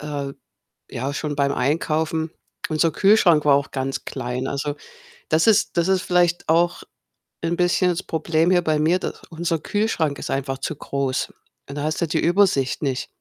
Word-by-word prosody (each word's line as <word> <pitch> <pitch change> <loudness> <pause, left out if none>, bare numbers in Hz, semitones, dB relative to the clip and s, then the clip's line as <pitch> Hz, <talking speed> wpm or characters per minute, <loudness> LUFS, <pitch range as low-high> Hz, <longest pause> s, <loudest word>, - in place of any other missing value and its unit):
äh, 145 -2 -4 0.6
ja, 135 +4 -3
schon 150 -1 -3
beim 140 -1 +1
Einkaufen. 160 +3 0 0.4
Unser 160 +1 +2
Kühlschrank 180 -6 +4
war 145 - +6
auch 140 -1 -1
ganz 135 0 -3
klein. 125 0 -4
Also, 145 +1 -3 0.5
das 160 +5 +2
ist 215 -2 +3
das 170 0 +2
ist 190 -1 +2
vielleicht 175 -1 +1
auch 170 +2 +2 0.6
'n 165 +1 0
bisschen 180 +1 +2
das 175 - -2
Problem 160 +1 0
hier 175 -1 +3
bei 155 -2 +1
mir, 160 +4 +3
dass - - -6
unser 165 0 -2
Kühlschrank 165 -7 -1
ist - - -5
einfach 135 0 -2
zu 155 - -4
groß. 135 -2 -2 0.4
Und 140 - -7
da 145 - -3
hast 155 +2 -2
du 170 - +1
die 150 - 0
Übersicht 175 -8 +2
nicht. 130 -3 -2
155 Hz, 175 wpm, -22 LUFS, 140-175 Hz, 0.6 s, war